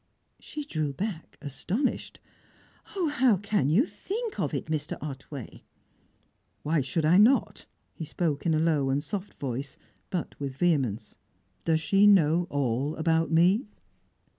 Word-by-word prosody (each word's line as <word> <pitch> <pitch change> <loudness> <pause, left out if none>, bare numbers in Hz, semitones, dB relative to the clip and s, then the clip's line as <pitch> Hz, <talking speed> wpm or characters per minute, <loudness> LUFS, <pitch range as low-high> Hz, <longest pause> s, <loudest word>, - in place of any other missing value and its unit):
She 300 - -6
drew 155 - -2
back, 180 +2 -5
astonished. 180 - -2 0.8
"Oh! 355 -5 +1
how 260 -7 +3
can 200 -7 0
you 200 - +4
think 445 +5 -5
of - - 0
it, - - -3
Mr. 155 -1 -3
Otway?" 140 -2 -8 1.0
"Why 155 0 +1
should 145 +5 -1
I 175 +5 +6
not?" 245 +6 +3 0.3
he - - -7
spoke 155 -1 -2
in 160 - +3
a - - +2
low 155 -4 +2
and 140 +2 0
soft 195 +5 -5
voice, 135 +1 -4 0.3
but 180 -3 -3
with 140 -2 -4
vehemence. 135 - 0 0.5
"Does 160 -1 +2
she 195 +5 +4
know 175 -3 +4
all 140 +1 -1
about 165 0 +1
me?" 180 +8 +3
160 Hz, 140 wpm, -28 LUFS, 145-200 Hz, 1.0 s, I